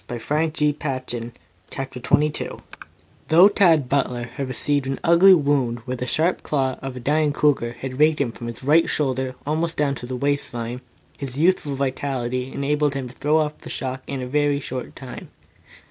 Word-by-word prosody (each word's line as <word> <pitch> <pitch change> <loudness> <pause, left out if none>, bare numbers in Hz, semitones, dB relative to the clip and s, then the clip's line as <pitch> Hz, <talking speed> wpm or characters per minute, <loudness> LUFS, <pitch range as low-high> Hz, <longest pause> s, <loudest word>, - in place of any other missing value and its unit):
CHAPTER 120 - -3
XXII 150 +3 0
PROFESSOR 130 -5 -3 0.4
ZEPPLIN'S 130 -2 -6
MYSTERIOUS 150 0 +2
FOE - - -17 0.7
Though 170 +5 +7
Tad 165 -9 +4
Butler 125 -3 0
had 135 +1 -4
received 140 +1 +1
an 135 - -3
ugly 180 +3 +7
wound 140 -6 +1
where 130 - -3
the 125 +1 -4
sharp 165 +7 +1
claw 135 -3 -1
of 135 -1 -6
the - - -6
dying 150 +4 +1
cougar 140 -5 +1
had 130 +1 -7
raked 155 0 +4
him 135 -5 0
from 120 0 -8
his 115 +2 -7
right 155 +5 +4
shoulder 130 -3 0
almost 160 +3 -1
down 145 -2 +1
to 125 -2 -7
the 130 - -4
waist 140 +2 0
line, 120 +2 -4 0.4
his 135 -2 -4
youthful 155 -3 +2
vitality 130 -2 -2
enabled 145 0 0
him 130 -2 -4
to - - -12
throw 150 +3 +1
off 150 -1 -1
the - - -10
shock 130 0 -4
of - - -20
it - - -4
in 135 - -3
a - - -5
very 145 +1 +1
short 130 -2 -6
time. 130 -2 -9
140 Hz, 195 wpm, -22 LUFS, 130-150 Hz, 0.7 s, Though